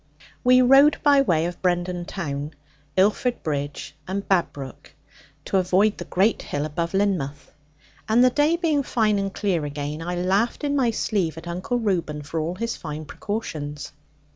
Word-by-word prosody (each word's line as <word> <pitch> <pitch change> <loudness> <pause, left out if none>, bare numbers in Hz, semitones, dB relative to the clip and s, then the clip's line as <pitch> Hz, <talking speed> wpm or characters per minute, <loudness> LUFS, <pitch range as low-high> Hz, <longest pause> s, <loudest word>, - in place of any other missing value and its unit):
We 255 0 +6
rode 275 +4 +6
by 285 -2 +6
way 165 -11 +2
of 175 0 -5
Brendon 175 -1 0
town, 150 -5 -5 0.4
Illford 210 +6 +2
Bridge, 145 -1 -4
and 195 +2 -3
Babbrook, 145 -8 -2 0.5
to 195 - +1
avoid 190 +3 +2
the - - -5
great 200 +5 +1
hill 145 +1 -3
above 170 +4 -3
Lynmouth; 180 -9 -1 0.6
and 235 +3 +5
the 255 - +5
day 295 +5 +3
being 325 -4 +1
fine 215 -6 +1
and 195 0 -2
clear 190 -6 -1
again, 145 +1 -4
I 175 +2 -3
laughed 195 - 0
in 285 -1 0
my 260 -4 +2
sleeve 195 -7 -1
at 165 +1 -9
Uncle 185 +8 -2
Reuben 170 -9 -1
for 160 +3 -4
all 165 +3 -2
his 230 +4 -3
fine 155 -1 -6
precautions. 150 -9 -5
185 Hz, 165 wpm, -24 LUFS, 155-225 Hz, 0.6 s, We